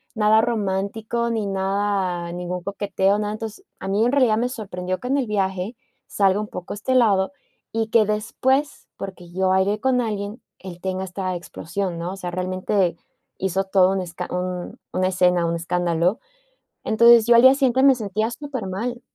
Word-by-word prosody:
nada 215 Hz, 0 st, +4 dB
romántico 220 Hz, +1 st, -1 dB
ni 225 Hz, -3 st, -1 dB
nada 195 Hz, -3 st, -1 dB
ningún 180 Hz, 0 st, -4 dB
coqueteo, 200 Hz, 0 st, 0 dB
nada. 210 Hz, 0 st, -2 dB
Entonces, 220 Hz, 0 st, -7 dB
a 190 Hz, -, -6 dB
mí 205 Hz, +3 st, +2 dB
en 245 Hz, -, +2 dB
realidad 250 Hz, -6 st, +4 dB
me 240 Hz, -, +1 dB
sorprendió 185 Hz, -6 st, -4 dB
que 250 Hz, -, -6 dB
en 280 Hz, -, +2 dB
el 260 Hz, -, -1 dB
viaje, 195 Hz, +1 st, -1 dB, 0.3 s
salga 195 Hz, 0 st, +2 dB
un 210 Hz, -, -3 dB
poco 180 Hz, -3 st, -7 dB
este 235 Hz, +5 st, -1 dB
lado, 200 Hz, -5 st, +3 dB, 0.4 s
y 225 Hz, -1 st, 0 dB
que 225 Hz, -1 st, +4 dB
después 260 Hz, +7 st, -1 dB
porque 185 Hz, -3 st, -8 dB
yo 190 Hz, +1 st, +1 dB
bailé 190 Hz, +3 st, +2 dB
con 260 Hz, -1 st, +2 dB
alguien, 210 Hz, 0 st, -4 dB, 0.2 s
él 180 Hz, -2 st, -9 dB
tenga 190 Hz, 0 st, -2 dB
esta 185 Hz, 0 st, -3 dB
explosión, 175 Hz, +1 st, -4 dB
¿no?, 175 Hz, +2 st, -4 dB
o 195 Hz, -, -8 dB
sea, 180 Hz, -2 st, -5 dB
realmente, 185 Hz, 0 st, 0 dB, 0.4 s
hizo 190 Hz, 0 st, -1 dB
todo 190 Hz, -1 st, +4 dB
un 195 Hz, -, -1 dB
escan 180 Hz, 0 st, -6 dB
un 180 Hz, 0 st, -4 dB
una 185 Hz, 0 st, +1 dB
escena, 180 Hz, -2 st, +2 dB
un 170 Hz, -, 0 dB
escándalo, 175 Hz, +3 st, 0 dB, 0.6 s
entonces, 235 Hz, +1 st, +6 dB
yo 240 Hz, -, +6 dB
al 235 Hz, -, +8 dB
día 260 Hz, 0 st, +9 dB
siguiente 260 Hz, -2 st, +2 dB
me 275 Hz, -2 st, +7 dB
sentía 215 Hz, +1 st, -2 dB
supermal. 240 Hz, -3 st, -4 dB
195 Hz, 175 wpm, -22 LUFS, 185-225 Hz, 0.6 s, día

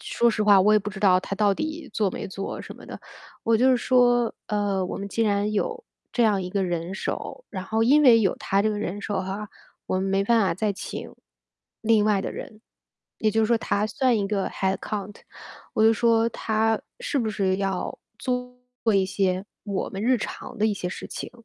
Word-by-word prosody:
说 235 Hz, -, +1 dB
实 215 Hz, -1 st, -1 dB
话 205 Hz, -2 st, +6 dB
我 210 Hz, +3 st, +5 dB
也 215 Hz, -, +6 dB
不 210 Hz, +1 st, -5 dB
知 195 Hz, -, -8 dB
道 185 Hz, -2 st, +4 dB
她 200 Hz, -, -5 dB
到 205 Hz, -1 st, +3 dB
底 310 Hz, +4 st, -4 dB
做 205 Hz, -4 st, +1 dB
没 -, -, -5 dB
做 195 Hz, +1 st, -5 dB
什 -, -, -9 dB
么 -, -, -13 dB
的。 -, -, -9 dB, 0.4 s
我 230 Hz, 0 st, +4 dB
就 255 Hz, +3 st, +4 dB
是 255 Hz, -, +4 dB
说， 245 Hz, -1 st, +3 dB
嗯， 205 Hz, -2 st, 0 dB
我 -, -, -4 dB
们 200 Hz, 0 st, -5 dB
既 225 Hz, +3 st, 0 dB
然 205 Hz, -1 st, +1 dB
有 460 Hz, -, -2 dB, 0.3 s
这 240 Hz, -, +3 dB
样 205 Hz, -3 st, +2 dB
一 180 Hz, -, -5 dB
个 195 Hz, 0 st, 0 dB
人 175 Hz, 0 st, -3 dB
手， -, -, -5 dB
然 190 Hz, -3 st, -5 dB
后 220 Hz, +4 st, 0 dB
因 290 Hz, +5 st, +5 dB
为 240 Hz, -4 st, +8 dB
有 195 Hz, -4 st, +2 dB
她 195 Hz, +1 st, 0 dB
这 215 Hz, -, +2 dB
个 210 Hz, -, -1 dB
人 205 Hz, 0 st, -3 dB
手 205 Hz, -1 st, -2 dB
哈， 195 Hz, +3 st, -5 dB, 0.4 s
我 -, -, -1 dB
们 -, -, -1 dB
没 195 Hz, 0 st, +2 dB
办 230 Hz, +1 st, +4 dB
法 195 Hz, -5 st, +2 dB
再 205 Hz, +3 st, 0 dB
请 -, -, -7 dB, 0.7 s
另 220 Hz, -2 st, +4 dB
外 210 Hz, -2 st, +3 dB
的 -, -, -4 dB
人。 215 Hz, 0 st, -9 dB, 0.6 s
也 215 Hz, -, +2 dB
就 225 Hz, +1 st, +2 dB
是 -, -, +3 dB
说 235 Hz, 0 st, +3 dB
她 210 Hz, -1 st, 0 dB
算 250 Hz, +1 st, +1 dB
一 200 Hz, -, 0 dB
个 195 Hz, -1 st, -1 dB
headcount。 195 Hz, +1 st, -3 dB, 0.6 s
我 220 Hz, -, +3 dB
就 225 Hz, -, +7 dB
说 230 Hz, 0 st, +3 dB
她 220 Hz, 0 st, 0 dB, 0.2 s
是 485 Hz, -, -1 dB
不 230 Hz, -4 st, 0 dB
是 190 Hz, -2 st, 0 dB
要 195 Hz, -2 st, -2 dB, 0.2 s
做 250 Hz, 0 st, -3 dB, 0.4 s
一 195 Hz, -, +4 dB
些 190 Hz, 0 st, 0 dB, 0.2 s
我 200 Hz, -2 st, -3 dB
们 195 Hz, +2 st, -5 dB
日 250 Hz, +2 st, +3 dB
常 250 Hz, +3 st, -6 dB
的 215 Hz, -, 0 dB
一 215 Hz, -, +1 dB
些 180 Hz, -3 st, -3 dB
事 -, -, -7 dB
情， -, -, -6 dB
210 Hz, 255 characters per minute, -25 LUFS, 195-230 Hz, 0.7 s, 为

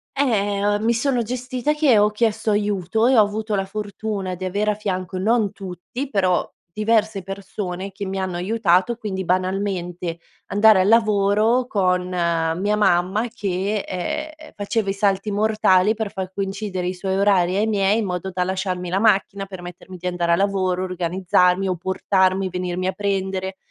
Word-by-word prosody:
Eh, 205 Hz, -7 st, +1 dB
o 205 Hz, 0 st, +2 dB
mi 225 Hz, +2 st, +2 dB
sono 250 Hz, +1 st, +1 dB
gestita 250 Hz, +4 st, -2 dB
che 300 Hz, -6 st, +4 dB
ho 210 Hz, 0 st, +5 dB
chiesto 215 Hz, 0 st, 0 dB
aiuto, 205 Hz, +1 st, +1 dB
e 260 Hz, -, +4 dB
ho -, -, +8 dB
avuto 210 Hz, +1 st, -1 dB
la 195 Hz, -, 0 dB
fortuna 205 Hz, -1 st, -4 dB
di 185 Hz, -, -8 dB
avere 205 Hz, +3 st, 0 dB
a -, -, -2 dB
fianco 185 Hz, -3 st, -3 dB
non 215 Hz, +1 st, +1 dB
tutti 195 Hz, +8 st, -7 dB
però 185 Hz, -7 st, +1 dB, 0.3 s
diverse 215 Hz, -1 st, +1 dB
persone 195 Hz, 0 st, -5 dB
che 195 Hz, +1 st, -6 dB
mi 195 Hz, 0 st, -4 dB
hanno 185 Hz, -2 st, -3 dB
aiutato, 190 Hz, +2 st, +2 dB
quindi 195 Hz, -4 st, -4 dB
banalmente 180 Hz, -2 st, -2 dB, 0.3 s
andare 205 Hz, -1 st, +5 dB
al 185 Hz, -, +2 dB
lavoro 215 Hz, +2 st, +3 dB
con 185 Hz, -6 st, 0 dB
mia 170 Hz, +2 st, 0 dB
mamma 195 Hz, +3 st, +2 dB
che, 200 Hz, -2 st, -2 dB
ehm, 310 Hz, -, -5 dB
faceva 205 Hz, 0 st, -1 dB
i -, -, +1 dB
salti 200 Hz, +1 st, 0 dB
mortali, 210 Hz, -1 st, +3 dB
per 215 Hz, -2 st, -3 dB
far 190 Hz, -2 st, -5 dB
coincidere 195 Hz, -2 st, -3 dB
i 180 Hz, -, -1 dB
suoi 190 Hz, +1 st, -3 dB
orari 190 Hz, -3 st, +3 dB
ai 215 Hz, +2 st, +1 dB
miei, 205 Hz, 0 st, +2 dB
in 220 Hz, -, -1 dB
modo 180 Hz, 0 st, -3 dB
da 180 Hz, 0 st, 0 dB
lasciarmi 185 Hz, -1 st, -2 dB
la 190 Hz, +2 st, 0 dB
macchina, 200 Hz, -2 st, +2 dB
permettermi 185 Hz, -1 st, -10 dB
di 180 Hz, +1 st, -5 dB
andare 175 Hz, -1 st, 0 dB
al -, -, +3 dB
lavoro, 190 Hz, -2 st, 0 dB
organizzarmi 180 Hz, +1 st, +1 dB
o 185 Hz, -, 0 dB
portarmi 190 Hz, +1 st, +1 dB
e -, -, -5 dB
venirmi 180 Hz, 0 st, -3 dB
a -, -, +1 dB
prendere. 190 Hz, -2 st, -2 dB
195 Hz, 170 wpm, -22 LUFS, 185-215 Hz, 0.3 s, ho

